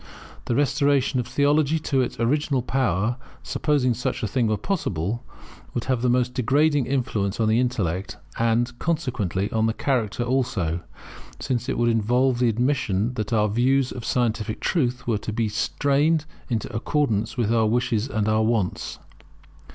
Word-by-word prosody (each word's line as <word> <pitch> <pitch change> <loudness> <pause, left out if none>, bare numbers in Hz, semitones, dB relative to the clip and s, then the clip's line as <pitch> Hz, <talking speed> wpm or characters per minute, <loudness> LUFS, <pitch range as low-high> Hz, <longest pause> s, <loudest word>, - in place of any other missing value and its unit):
The 120 - 0
restoration 140 -1 +2
of 120 - -2
theology 145 +2 +2
to 140 -4 0
its 125 -1 -3
original 135 +2 +1
power, 120 -3 0 0.3
supposing 140 -5 +1
such 125 +1 -3
a - - +1
thing 120 +2 +1
were 110 -1 +1
possible, 110 - -2 0.5
would 120 - -1
have 130 -3 0
the 125 - +2
most 125 0 +1
degrading 140 +3 +2
influence 110 -7 -1
on 110 - +2
the 110 +2 +3
intellect, 100 -8 -1 0.2
and, 115 +1 +1
consequently, 120 - -1
on 110 0 +2
the 110 - -1
character 120 -4 0
also; 115 -10 0 0.6
since 125 -2 -2
it - - -1
would 120 0 +2
involve 120 +3 +2
the 125 -1 +3
admission 120 -2 0
that 110 -3 -4
our 105 -2 +3
views 130 +5 +2
of 125 - -7
scientific 115 -3 -1
truth 125 -7 0
were 115 -4 0
to 110 - -5
be 110 +1 0
strained 145 +8 +1 0.2
into 115 -2 -2
accordance 115 -3 0
with 115 -2 +1
our 110 -2 +3
wishes 115 0 0
and 110 -6 -1
our 110 0 +3
wants. 110 -5 -1
120 Hz, 160 wpm, -24 LUFS, 110-135 Hz, 0.6 s, the